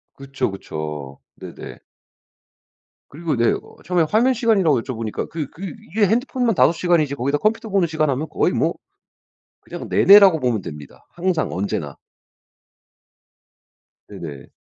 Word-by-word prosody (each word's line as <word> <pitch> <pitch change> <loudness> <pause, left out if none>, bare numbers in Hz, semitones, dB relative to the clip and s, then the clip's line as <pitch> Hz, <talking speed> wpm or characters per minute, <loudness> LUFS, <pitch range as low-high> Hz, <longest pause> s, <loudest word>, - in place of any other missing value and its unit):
그쵸, 135 -5 -3
그쵸. 75 -7 -6 0.2
네네. - - -10 1.3
그리고 155 0 -3
네 115 -1 +3
어 - - -6
처음에 180 -2 +2
화면 240 +5 +3
시간이라고 195 - +2
여쭤보니까 115 -4 -5
그 155 -3 -4
그 190 +1 -7 0.2
이게 210 +1 +3
핸드폰만 245 +1 0
5 - - +5
시간이지 165 -5 +1
거기다 140 +2 0
컴퓨터 220 +6 -1
보는 195 -3 +2
시간 155 -1 0
하면 140 +4 -1
거의 - - +1
뭐 - - +1 0.9
그냥 - - -8
내내라고 195 -4 +7
보면 120 -6 0
됩니다. 75 -4 -10
항상. 175 -2 -1
언제나. 95 +3 -3 2.1
네네. 75 -5 -9
155 Hz, 290 characters per minute, -21 LUFS, 115-195 Hz, 2.1 s, 내내라고